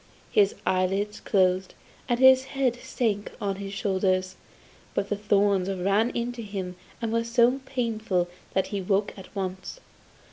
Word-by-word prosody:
His 205 -1 +4
eyelids 195 +3 0
closed, 185 -1 +1 0.3
and 240 0 +1
his 260 0 +7
head 255 -3 +2
sank 215 -4 -2
on 195 -1 -2
his 195 0 -6
shoulders, 190 -2 0 0.6
but 200 - -1
the 205 - +1
thorns 200 -2 +2
ran 195 +5 +2
into 240 0 -3
him 195 -4 -5 0.3
and 225 -1 -1
were 230 0 +2
so 240 +3 +3
painful 220 -8 -1 0.3
that 190 - +3
he 200 - 0
awoke 195 +2 0
at 190 - -11
once. 190 - -4
200 Hz, 145 wpm, -26 LUFS, 190-230 Hz, 0.6 s, his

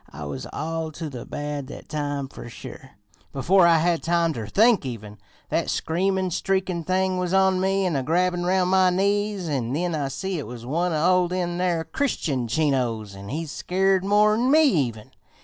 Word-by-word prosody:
I 75 +1 -8
was 70 -2 -6
all 160 0 -3
to 155 -1 -6
the 125 -3 -8
bad 145 -2 -4
that - - -10
time 145 -2 -3
fer 125 - -10
sure. 135 +3 -11 0.4
Before 175 +6 +4
I 165 -1 +5
had 170 +1 +1
time 170 -1 +1
ter 110 -6 -5
think 225 - +4
even, 105 -5 -7 0.3
that - - 0
screamin', 185 +3 0
streakin' 190 -1 -1
thing 185 0 +1
was 180 +1 0
on 190 -1 +3
me 195 0 +1
an 175 -4 0
a 135 - +1
grabbin' 175 +4 +1
roun' 180 0 +2
my 185 -1 +4
knees; 200 0 0
an' 130 -5 -2
then 175 +3 -1
I 145 -3 -1
see 180 +6 -3
it 140 - -6
was 120 0 -9
one 170 +7 0
o' 180 +3 +3
them 175 -1 -2
near 175 -2 0
Christian 155 - -2
Chinos, 120 -6 0
an' 100 +1 -9
he's 155 +2 -4
skeered 190 +2 +1
more'n 210 +4 +3
me 310 +3 +6
even. 130 - 0
170 Hz, 185 wpm, -24 LUFS, 140-190 Hz, 0.4 s, me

